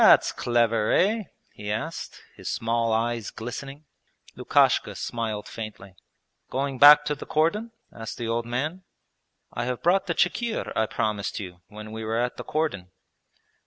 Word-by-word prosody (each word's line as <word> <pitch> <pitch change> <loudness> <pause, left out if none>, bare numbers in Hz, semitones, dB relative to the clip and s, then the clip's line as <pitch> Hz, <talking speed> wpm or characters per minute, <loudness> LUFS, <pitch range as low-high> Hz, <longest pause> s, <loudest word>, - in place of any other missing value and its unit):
'That's - - +7
clever, 115 -2 +1
eh?' 215 +2 +3 0.3
he 105 0 -5
asked, 140 +10 -5
his - - -6
small 115 0 0
eyes 115 0 0
glistening. 135 +5 -7 0.5
Lukashka - - +3
smiled 110 -3 -3
faintly. 100 -4 -8 0.6
'Going 135 0 -2
back 150 +1 +9
to 150 - 0
the 145 - -8
cordon?' 170 +9 +1 0.2
asked 115 -1 -7
the 120 - -3
old 115 +1 -1
man. 150 +10 -2 0.7
'I 120 - -2
have 125 -1 -3
brought 190 +3 +3
the 170 - 0
chikhir 225 +5 0
I 110 - +2
promised 105 -2 -2
you 90 -3 -8
when 105 0 -10
we 110 0 -5
were 110 +1 -1
at 120 +1 -1
the - - -5
cordon.' 150 - -2
120 Hz, 155 wpm, -26 LUFS, 110-150 Hz, 0.7 s, back